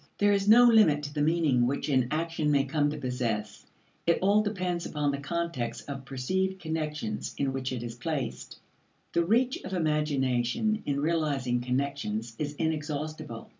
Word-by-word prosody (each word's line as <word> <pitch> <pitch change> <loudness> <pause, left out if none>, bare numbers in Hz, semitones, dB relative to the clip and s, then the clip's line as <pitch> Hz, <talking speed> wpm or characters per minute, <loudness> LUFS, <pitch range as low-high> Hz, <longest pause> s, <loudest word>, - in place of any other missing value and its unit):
There 205 0 +4
is 200 0 +1
no 240 +3 +9
limit 215 -11 +5
to 145 0 -5
the 145 - -1
meaning 150 -6 +3
which 140 +2 -2
an 130 -4 +2
action 160 -1 -1
may 140 -2 +4
come 145 +1 +1
to 150 - -4
possess. 120 -6 -3 0.4
It 170 - +4
all 200 +3 +4
depends 185 -5 -2
upon 150 -2 0
the 140 - -3
context 140 -6 -3
of 135 -2 -6
perceived 190 +9 -1
connections 150 - -3
in 135 -1 0
which 130 -1 -3
it 125 -2 -4
is 120 -1 -5
placed; 135 +3 -4 0.6
the 170 - +3
reach 240 +8 +2
of 190 - -6
imagination 150 - +1
in 140 -1 0
realizing 145 -6 0
connections 125 -3 -2
is 145 -1 -2
inexhaustible. 155 -4 -3
150 Hz, 165 wpm, -28 LUFS, 130-170 Hz, 0.6 s, no